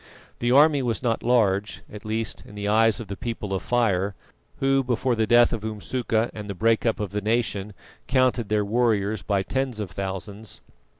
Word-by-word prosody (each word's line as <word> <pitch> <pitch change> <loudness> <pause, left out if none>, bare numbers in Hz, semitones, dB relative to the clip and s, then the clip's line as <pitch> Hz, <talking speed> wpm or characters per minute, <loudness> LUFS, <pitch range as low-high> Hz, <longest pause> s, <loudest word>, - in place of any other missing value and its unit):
The 120 - 0
army 145 +2 +5
was 120 -1 -2
not 115 -2 0
large, 105 -5 +1
at 105 -1 -10
least 110 +1 -3
in 105 - -14
the 100 0 -4
eyes 110 +1 +3
of 115 - -7
the 100 - -5
People 105 -3 -4
of 95 - -1
Fire 100 -5 +1 0.4
who, 135 0 +2
before 125 0 0
the 110 -2 0
death 120 +1 +5
of 110 -2 -3
Umsuka 110 +1 -1
and 105 -1 -7
the 100 - -4
break 115 +4 +2
up 115 - 0
of 105 -3 -3
the 105 0 -2
nation, 105 -2 -1 0.3
counted 130 -4 +2
their 105 -1 +1
warriors 110 -2 +1
by 100 -2 0
tens 130 0 -2
of 100 -5 -4
thousands. 100 +3 -6
110 Hz, 190 wpm, -24 LUFS, 100-120 Hz, 0.4 s, army